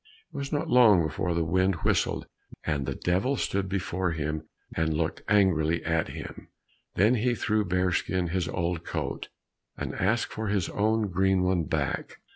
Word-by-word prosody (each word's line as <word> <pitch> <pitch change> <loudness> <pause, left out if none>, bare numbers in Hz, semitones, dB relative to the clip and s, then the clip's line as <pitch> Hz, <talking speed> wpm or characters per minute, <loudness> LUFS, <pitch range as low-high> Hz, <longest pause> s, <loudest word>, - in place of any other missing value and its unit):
It - - -14
was 140 0 -4
not 145 - -1
long 110 -8 +6
before 85 +3 -2
the 85 - +1
wind 95 +3 +2
whistled, - - +1 0.4
and 70 -4 -1
the - - -2
Devil 95 +10 +1
stood 100 -6 -1
before 90 -2 -1
him 80 0 -3 0.3
and 80 -1 0
looked 80 +1 -1
angrily 85 -5 +3
at 80 -1 +1
him; - - -8 0.5
then 105 +6 +4
he 120 +1 +1
threw 105 +1 +1
Bearskin 90 -1 0
his 90 0 -1
old 85 -1 -2
coat, - - -4 0.5
and - - -4
asked 110 +6 0
for 110 0 -3
his 100 -3 0
own 110 0 +1
green 95 0 +2
one 90 -3 +1
back. - - -2
95 Hz, 165 wpm, -27 LUFS, 85-105 Hz, 0.5 s, long